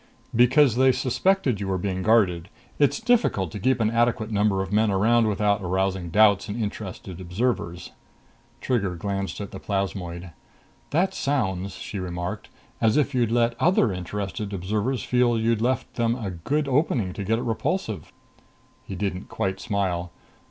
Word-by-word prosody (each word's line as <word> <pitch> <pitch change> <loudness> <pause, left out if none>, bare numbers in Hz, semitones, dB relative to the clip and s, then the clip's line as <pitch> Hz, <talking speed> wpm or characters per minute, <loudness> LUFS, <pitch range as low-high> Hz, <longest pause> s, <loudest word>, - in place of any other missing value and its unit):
"Because 125 +1 +5
they 130 0 +5
suspected 130 - +1
you 100 - -3
were 95 -1 0
being 95 0 -2
guarded. 95 -5 +2 0.3
It's 145 -1 +3
difficult 220 - +1
to 105 - -6
keep 130 +6 +2
an 110 -1 +2
adequate 115 -1 +1
number 100 -2 +2
of 95 +1 -7
men 110 +1 +3
around 110 +4 +3
without 105 -1 +1
arousing 95 -1 -1
doubts 100 +2 +4
in 105 +4 -4
interested 95 -4 -5
observers." 90 -2 -2 0.7
Trigger 100 -8 0
glanced 100 0 -3
at 100 -2 -6
the 95 - -7
plasmoid. 90 -3 -3 0.6
"That 185 +5 +1
sounds," 100 - -1
she 100 - -6
remarked, 90 -1 -5 0.3
"as 110 +1 +3
if 145 -1 +1
you'd 120 -3 +2
let 120 0 +2
other 155 - +3
interested 100 +2 -4
observers 105 +7 -1
feel 125 -2 +2
you'd 115 0 +1
left 125 +1 -1
them 115 -1 +1
a 110 -6 -4
good 140 - -1
opening 130 - +1
to 100 - -5
get 110 +3 +1
at 120 - -4
Repulsive." 115 -2 -2 0.7
He 95 - -7
didn't 95 -1 -3
quite 95 0 -2
smile. 90 -4 -2
105 Hz, 160 wpm, -25 LUFS, 95-120 Hz, 0.7 s, Because